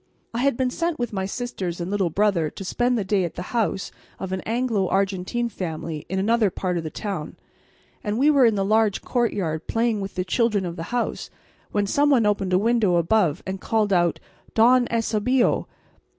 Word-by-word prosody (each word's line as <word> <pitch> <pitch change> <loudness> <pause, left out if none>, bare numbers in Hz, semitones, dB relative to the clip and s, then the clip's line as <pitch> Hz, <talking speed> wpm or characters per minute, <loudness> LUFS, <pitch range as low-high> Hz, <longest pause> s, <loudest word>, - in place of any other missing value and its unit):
I 230 - -2
had 275 -1 +2
been 255 -1 0
sent 335 +3 -1
with 240 -2 -3
my 190 -1 -2
sisters 195 -7 -4
and 175 +2 -4
little 195 -4 +1
brother 185 -3 +1
to 195 - -9
spend 245 +5 +1
the 210 - 0
day 195 0 +1
at 170 - -4
the 175 - -4
house 220 -5 -1 0.3
of 190 - -5
an 190 -1 -2
Anglo 225 -4 0
Argentine 195 +5 0
family 165 -6 -5
in 190 - -2
another 215 +2 +3
part 180 -1 -2
of - - -5
the 155 - -4
town, 185 -4 -5 0.7
and 210 0 -1
we 285 +4 +5
were 280 -3 +5
in 220 - +2
the 195 -1 0
large 215 -1 +2
courtyard 190 -10 -1
playing 225 -2 0
with 195 0 -6
the 185 - -1
children 215 -2 +1
of 170 -1 -4
the 165 -1 -5
house 245 -1 -2 0.4
when 205 -1 +1
some 285 +8 +2
one 250 -6 +4
opened 200 -2 +1
a 180 - +4
window 220 -3 +2
above 170 -2 +2
us - - -31
and 190 0 -5
called 215 -3 +1
out, 175 -2 +2 0.4
"Don 245 +2 +5
Eusebio!" 230 +2 +1
205 Hz, 205 wpm, -24 LUFS, 185-235 Hz, 0.7 s, we